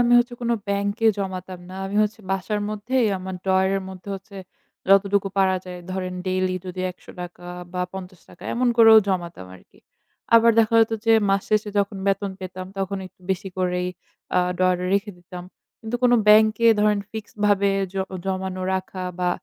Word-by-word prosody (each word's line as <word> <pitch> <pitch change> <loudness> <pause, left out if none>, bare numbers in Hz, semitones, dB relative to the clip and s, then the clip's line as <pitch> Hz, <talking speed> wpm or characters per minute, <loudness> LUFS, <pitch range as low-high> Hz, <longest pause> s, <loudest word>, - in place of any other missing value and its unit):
আমি 240 0 +3
হচ্ছে 240 0 0
কোন 235 - 0 0.2
bank 200 0 0
এ - - +8
জমাতাম 185 -2 -5
না। 185 - -8
আমি 200 +1 -4
হচ্ছে 215 +1 -2
বাসার 195 +2 -1
মধ্যেই 225 +3 0
আমার 190 0 -6
drawer 190 0 +3
এর 195 - -3
মধ্যে 190 +1 -10
হচ্ছে 195 +1 -11 0.5
যতটুকু 195 0 +4
পারা 190 -1 +3
যায় 180 -1 -8
ধরেন 185 -1 -3
daily 185 0 0
যদি 185 0 -5
১০০ 180 - -18
টাকা 175 0 -9 0.3
বা 180 0 -1
৫০ 185 -2 -9
টাকা - - -16
এমন 245 +1 +2
করেও 225 -1 +9
জমাতাম 175 - -3
আরকি। 90 - -19 0.6
আবার 230 0 +7
দেখা 225 0 +3
যেত 225 0 +2
যে 225 - +6 0.2
মাস 195 0 +2
শেষে 215 0 +1
যখন 200 0 0
বেতন 195 0 0
পেতাম 185 0 -7
তখন 195 0 -2
একটু 185 - -20
বেশি 190 +1 -2
করেই 180 0 0 0.5
আ - - +6 0.2
ডয়ারে 185 -1 +2
রেখে 200 +1 0
দিতাম। 175 0 -10 0.4
কিন্তু 225 +1 -3
কোন 245 -1 +5 0.2
ব্যাংকে 215 +2 +6
ধরেন 210 0 +3
ফিক্সড 220 -1 -8
ভাবে 200 -1 +3 0.2
জ - - -6 0.3
জমানো 190 -1 -3
রাখা 185 0 -4
বা 180 - +1
195 Hz, 180 wpm, -23 LUFS, 185-210 Hz, 0.6 s, করেও